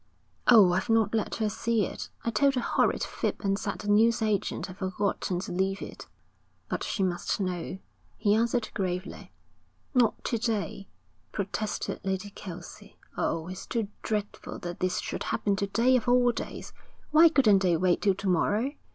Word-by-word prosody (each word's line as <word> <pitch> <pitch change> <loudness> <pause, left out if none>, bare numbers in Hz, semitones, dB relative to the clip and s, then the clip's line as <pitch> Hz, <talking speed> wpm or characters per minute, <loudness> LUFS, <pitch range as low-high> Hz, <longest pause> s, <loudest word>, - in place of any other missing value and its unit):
'Oh, 210 -7 +7
I've 190 +5 -1
not 225 -2 +3
let 220 -2 0
her 220 - 0
see 220 0 0
it. - - -6 0.2
I 230 - +1
told 275 +2 +3
a - - +3
horrid - - +1
fib - - -2
and 195 -1 0
said 200 0 -3
the 205 - -8
newsagent 215 0 +2
had 185 -1 -10
forgotten 190 -1 -1
to - - -6
leave 190 +2 0
it.' - - -9 0.6
'But - - -3
she 195 - -1
must 180 +1 -1
know,' 180 -1 -3 0.4
he 205 - +2
answered 230 +1 +1
gravely. 185 -1 -4 0.6
'Not 245 -4 +2
to 230 - -1
day,' 215 -3 -2 0.4
protested 205 +1 -3
Lady 190 +1 -2
Kelsey. 180 -3 -10 0.2
'Oh, 165 0 -1
it's 185 0 -7
too 225 -4 -2
dreadful 210 -2 -3
that 175 0 -6
this 185 0 0
should - - -4
happen 200 -1 0
to 200 -1 -1
day 235 +6 +3
of 250 -1 0
all 245 0 +5
days. - - -7 0.4
Why 325 +2 +8
couldn't 230 -10 +5
they 175 -3 +3
wait 180 +1 +2
till 195 -2 +3
to 195 - -5
morrow? 205 +8 +2
205 Hz, 170 wpm, -28 LUFS, 185-225 Hz, 0.6 s, Why